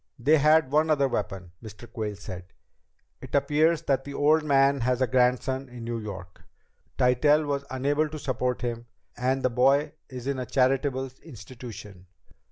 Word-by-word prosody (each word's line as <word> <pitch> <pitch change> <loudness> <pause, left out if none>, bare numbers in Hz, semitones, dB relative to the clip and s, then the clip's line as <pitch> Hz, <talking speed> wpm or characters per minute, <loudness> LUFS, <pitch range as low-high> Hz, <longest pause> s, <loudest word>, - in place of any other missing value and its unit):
"They 145 +6 +3
had 155 -1 +4
one 155 +2 +3
other 140 -3 +3
weapon," 95 -7 -4
Mr. 110 +1 -11
Quayle 110 -2 -4
said. 95 -2 -10 0.7
"It - - -6
appears 150 +3 +2
that 135 -4 0
the 140 0 -8
old 155 +2 +3
man 140 -1 +3
has 125 +1 +1
a 130 - +3
grandson 130 +1 +1
in 120 -1 -9
New 115 0 -3
York. 95 -4 -9 0.6
Tytell 145 +4 +3
was 140 -1 -2
unable 145 +4 0
to 155 - -7
support 125 -3 -2
him 120 -1 -4 0.3
and 130 +2 -1
the 130 - +2
boy 135 +5 +3 0.2
is 125 -2 -8
in 140 -1 -2
a 125 - -4
charitable 135 +1 +1
institution. 110 - -11
130 Hz, 165 wpm, -26 LUFS, 120-140 Hz, 0.7 s, had